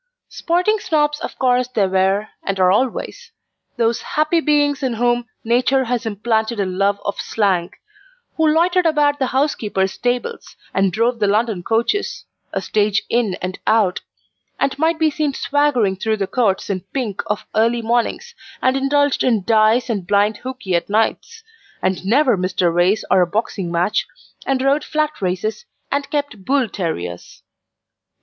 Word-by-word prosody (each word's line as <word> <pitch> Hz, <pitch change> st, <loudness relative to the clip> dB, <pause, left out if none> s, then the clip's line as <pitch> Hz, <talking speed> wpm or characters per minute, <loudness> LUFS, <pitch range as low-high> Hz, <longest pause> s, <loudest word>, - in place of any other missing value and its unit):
Sporting 365 Hz, +6 st, 0 dB
Snobs 295 Hz, -4 st, 0 dB
of -, -, -6 dB
course 250 Hz, -1 st, +2 dB
there 215 Hz, -6 st, +1 dB
were, 190 Hz, +3 st, +1 dB
and 195 Hz, -1 st, -2 dB
are 185 Hz, 0 st, +5 dB
always 265 Hz, -, -2 dB, 0.5 s
those 230 Hz, 0 st, +1 dB
happy 310 Hz, +2 st, +1 dB
beings 290 Hz, -2 st, +1 dB
in 255 Hz, -4 st, -1 dB
whom 240 Hz, +1 st, +1 dB, 0.2 s
Nature 255 Hz, +3 st, +2 dB
has 240 Hz, -1 st, -2 dB
implanted 220 Hz, +1 st, -1 dB
a 200 Hz, -, +1 dB
love 195 Hz, +2 st, 0 dB
of 200 Hz, -, -2 dB
slang: 185 Hz, -5 st, 0 dB, 0.7 s
who 320 Hz, -1 st, +2 dB
loitered 345 Hz, +3 st, +3 dB
about 295 Hz, -2 st, +2 dB
the 265 Hz, -, +1 dB
horsekeeper's 220 Hz, -9 st, 0 dB
stables, 245 Hz, -, -3 dB, 0.2 s
and 195 Hz, -1 st, +2 dB
drove 230 Hz, +4 st, 0 dB
the 205 Hz, -, +2 dB
London 210 Hz, -1 st, +1 dB
coaches 230 Hz, -, -1 dB, 0.3 s
a -, -, -3 dB
stage 210 Hz, -1 st, +1 dB
in 230 Hz, -6 st, +1 dB
and 185 Hz, 0 st, -4 dB
out 210 Hz, -5 st, +2 dB, 0.6 s
and 275 Hz, 0 st, 0 dB
might 320 Hz, +1 st, +2 dB
be 315 Hz, -1 st, +2 dB
seen 295 Hz, -2 st, -1 dB
swaggering 275 Hz, -9 st, +1 dB
through 220 Hz, +3 st, -1 dB
the 200 Hz, -, -1 dB
courts 200 Hz, -3 st, 0 dB
in 185 Hz, -2 st, -2 dB
pink 220 Hz, -7 st, -2 dB
of 210 Hz, 0 st, -2 dB
early 230 Hz, +2 st, +2 dB
mornings, 240 Hz, -, -1 dB, 0.3 s
and 260 Hz, +1 st, +2 dB
indulged 285 Hz, +1 st, +2 dB
in 225 Hz, -6 st, +2 dB
dice 220 Hz, +4 st, +3 dB
and 200 Hz, -7 st, -3 dB
blind 205 Hz, +2 st, +2 dB
hookey 255 Hz, -7 st, -5 dB
at 170 Hz, +2 st, 0 dB
nights, 225 Hz, -, -1 dB, 0.4 s
and 185 Hz, 0 st, -1 dB
never 245 Hz, +4 st, +3 dB
missed 185 Hz, 0 st, -2 dB
a 170 Hz, -, +4 dB
race 180 Hz, +5 st, +2 dB
or 190 Hz, -, +5 dB
a 175 Hz, -, +3 dB
boxing 195 Hz, -2 st, -2 dB
match; 175 Hz, +4 st, 0 dB, 0.4 s
and 265 Hz, -1 st, +1 dB
rode 280 Hz, +2 st, +2 dB
flat 305 Hz, -3 st, -2 dB
races, 190 Hz, -, -2 dB, 0.3 s
and 280 Hz, 0 st, -1 dB
kept 285 Hz, -9 st, -3 dB
bull 270 Hz, +2 st, +1 dB
terriers. 90 Hz, -, -5 dB
230 Hz, 160 wpm, -19 LUFS, 200-280 Hz, 0.7 s, are